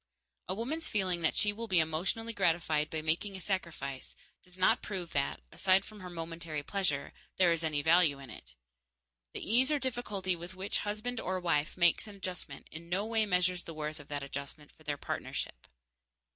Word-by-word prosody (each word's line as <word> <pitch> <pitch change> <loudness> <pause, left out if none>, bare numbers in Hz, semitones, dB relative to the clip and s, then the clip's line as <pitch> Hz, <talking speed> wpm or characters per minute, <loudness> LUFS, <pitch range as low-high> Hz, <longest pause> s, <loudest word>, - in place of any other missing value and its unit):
A 185 - 0
woman's 275 +10 -2
feeling 185 -4 +1
that 160 - +2
she 205 -1 +3
will 230 +2 -5
be 185 - +3
emotionally 180 +9 0
gratified 165 -5 +2
by 155 -1 -3
making 175 +6 0
a - - -6
sacrifice 170 -8 -3 0.3
does 180 0 -12
not 185 - +4
prove 185 -5 -4
that, 140 - 0
aside 190 0 +4
from 215 -1 -11
her 185 -2 -7
momentary 165 -3 -4
pleasure, 165 -6 0 0.2
there 180 -2 +6
is 165 0 +1
any 150 -2 +1
value 160 -3 +5
in 135 -4 -10
it. - - -12 0.8
The - - -4
ease 255 +6 +5
or 300 - +4
difficulty 210 -8 -1
with 175 +2 -8
which 190 +2 -1
husband 215 +4 -2
or 185 -2 -1
wife 160 -4 +1
makes 175 +4 +4
an 205 - -9
adjustment 180 -7 -5
in 170 +2 -9
no 190 +4 +1
way 220 -1 +2
measures 180 -1 +2
the 165 - -7
worth 155 0 -3
of 145 - -12
that 145 -1 -3
adjustment 140 +1 -7
for - - -25
their 145 -2 -2
partnership. - - -3
180 Hz, 190 wpm, -33 LUFS, 155-200 Hz, 0.8 s, there